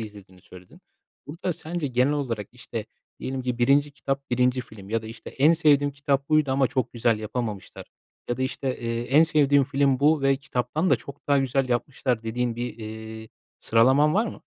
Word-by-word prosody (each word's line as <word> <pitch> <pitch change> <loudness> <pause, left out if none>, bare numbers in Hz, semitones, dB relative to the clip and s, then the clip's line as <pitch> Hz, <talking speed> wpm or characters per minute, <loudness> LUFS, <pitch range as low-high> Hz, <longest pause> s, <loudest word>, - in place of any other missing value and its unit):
izlediğini 100 -4 -11
söyledin. 90 0 -16 0.5
Burada 170 +5 -3
sence 165 -1 -4
genel 130 +3 +2
olarak, 115 -8 -3
işte, 120 -3 -7 0.3
diyelim 130 0 -4
ki, 125 -1 -3
1'inci 140 +4 +3
kitap, 140 0 -4
1'inci 125 +1 +2
film 105 -5 -12
ya 115 0 0
da, - - -9
işte, 115 +1 -9
"En 150 +5 +4
sevdiğim 145 -3 +3
kitap 140 0 -1
buydu 155 -3 +3
ama 135 0 +3
çok 130 0 -2
güzel 115 -2 +1
yapamamışlar." 110 -2 -5 0.4
ya 120 - -1
da, - - -7
eee, - - +2
işte, 135 0 -4 0.4
"En 145 +4 +6
sevdiğim 145 -3 +3
film 140 -1 +1
bu 150 0 +3
ve 135 0 +3
kitaptan 145 +5 -2
da - - +5
çok 140 0 -12
daha 140 -1 +4
güzel 135 0 0
yapmışlar." 125 -1 -1
dediğin 115 +1 -2
bir, 120 -1 -4
iii, 110 0 -8 0.3
sıralaman 130 +7 +4
var 220 +4 +2
mı? - - -8
130 Hz, 185 wpm, -25 LUFS, 115-145 Hz, 0.5 s, En